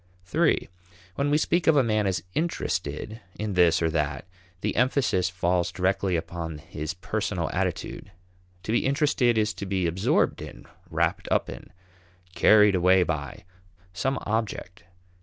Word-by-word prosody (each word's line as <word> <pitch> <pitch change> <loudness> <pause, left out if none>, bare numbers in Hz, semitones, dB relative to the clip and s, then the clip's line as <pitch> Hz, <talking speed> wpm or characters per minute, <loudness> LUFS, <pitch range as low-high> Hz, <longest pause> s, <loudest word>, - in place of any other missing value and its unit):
(iii) - - +2 0.5
When 140 +6 -1
we 145 - +3
speak 170 +2 0
of 160 - +6
a 140 - +5
man 110 -3 +1
as 90 -3 -1
interested 110 - -3 0.2
in 105 -1 -3
this 85 -2 +4
or 80 - +2
that 75 -2 -2 0.4
the - - -1
emphasis 125 -7 +2
falls 90 -1 0
directly 95 0 0
upon 80 -1 -4
his 75 +2 -6
personal 90 - -2
attitude. 100 - -3 0.5
To 110 - -3
be 115 - +2
interested 135 -4 +2
is 110 0 +1
to 100 - -6
be 95 -2 0
absorbed 85 +3 +1
in, - - -10 0.2
wrapped - - 0
up - - +1
in, - - -11 0.6
carried 105 0 +6
away 90 0 +4
by, 75 -1 -4 0.5
some 135 +9 -1
object. 105 -5 -3
95 Hz, 145 wpm, -26 LUFS, 85-110 Hz, 0.6 s, of